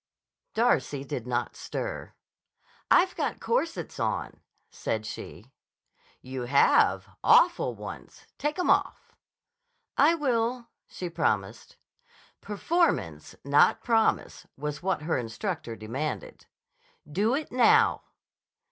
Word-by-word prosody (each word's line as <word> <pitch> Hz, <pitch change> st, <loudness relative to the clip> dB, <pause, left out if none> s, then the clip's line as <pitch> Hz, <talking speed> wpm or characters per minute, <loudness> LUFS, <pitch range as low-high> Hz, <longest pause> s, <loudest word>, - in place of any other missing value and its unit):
Darcy 145 Hz, -, +1 dB
did 125 Hz, -3 st, -5 dB
not 120 Hz, -1 st, -2 dB
stir. -, -, -5 dB, 0.8 s
"I've 365 Hz, +1 st, +4 dB
got -, -, -2 dB
corsets 335 Hz, -9 st, -2 dB
on," -, -, -2 dB, 0.3 s
said 110 Hz, -1 st, -3 dB
she. 110 Hz, +1 st, -9 dB, 0.7 s
"You 130 Hz, -1 st, -5 dB
have. 140 Hz, +3 st, +4 dB, 0.2 s
Awful 480 Hz, +2 st, +4 dB
ones. -, -, -10 dB
Take 295 Hz, +3 st, -1 dB
'em 360 Hz, -, +2 dB
off." -, -, 0 dB, 0.8 s
"I 305 Hz, +5 st, +6 dB
will," 240 Hz, -4 st, -1 dB, 0.2 s
she 180 Hz, -, -6 dB
promised. 105 Hz, -, -2 dB, 0.7 s
Performance, 330 Hz, -, -1 dB
not -, -, +4 dB
promise, 225 Hz, -2 st, +1 dB
was 150 Hz, +1 st, -4 dB
what 190 Hz, -4 st, -1 dB
her 160 Hz, -3 st, 0 dB
instructor 120 Hz, -, -4 dB
demanded. 135 Hz, -, -5 dB, 0.6 s
"Do 205 Hz, -, +1 dB
it 300 Hz, +1 st, -4 dB
now." 445 Hz, -, +4 dB
195 Hz, 105 wpm, -27 LUFS, -, 0.8 s, I